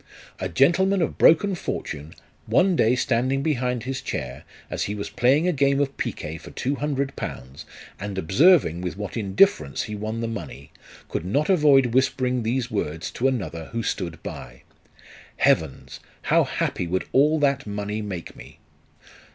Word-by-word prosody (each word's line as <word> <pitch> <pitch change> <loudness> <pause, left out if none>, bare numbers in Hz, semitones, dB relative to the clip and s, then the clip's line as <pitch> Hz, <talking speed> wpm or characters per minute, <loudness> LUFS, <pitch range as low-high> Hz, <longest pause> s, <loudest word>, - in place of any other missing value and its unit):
A 95 - -3
gentleman 185 - +3
of - - -4
broken 195 +5 +5
fortune, 75 - -5 0.3
one 185 0 +3
day 120 -4 +3
standing 130 +2 0
behind 125 -5 -1
his 130 +1 -4
chair, 65 - -5 0.2
as - - -3
he 105 - -3
was 100 - -5
playing 135 +7 +3
a - - +3
game 140 -1 +2
of 140 -1 -1
picojiet 80 +1 -5
for - - -11
two 135 - -2
hundred 140 -2 -2
pounds, 65 +3 -7 0.3
and 100 -1 -5
observing 95 - +4
with 90 +1 -4
what 105 -3 -5
indifference 115 - +2
he 105 - -6
won 110 +2 -4
the 115 - -2
money, 75 - -7 0.4
could - - -3
not 140 - 0
avoid 140 -8 +4
whispering 130 -1 +1
these 120 +2 -1
words 80 -5 -3
to 130 - 0
another 95 -11 -3
who 115 0 -2
stood 85 -7 -3
by, - - -8 0.4
" - - -21
Heavens! 80 -4 0 0.2
how - - +3
happy 90 - -2
would 95 +2 -1
all 150 +4 +4
that 140 -4 +1
money 105 +1 -3
make 95 -5 -6
me - - -13
120 Hz, 165 wpm, -24 LUFS, 95-140 Hz, 0.4 s, broken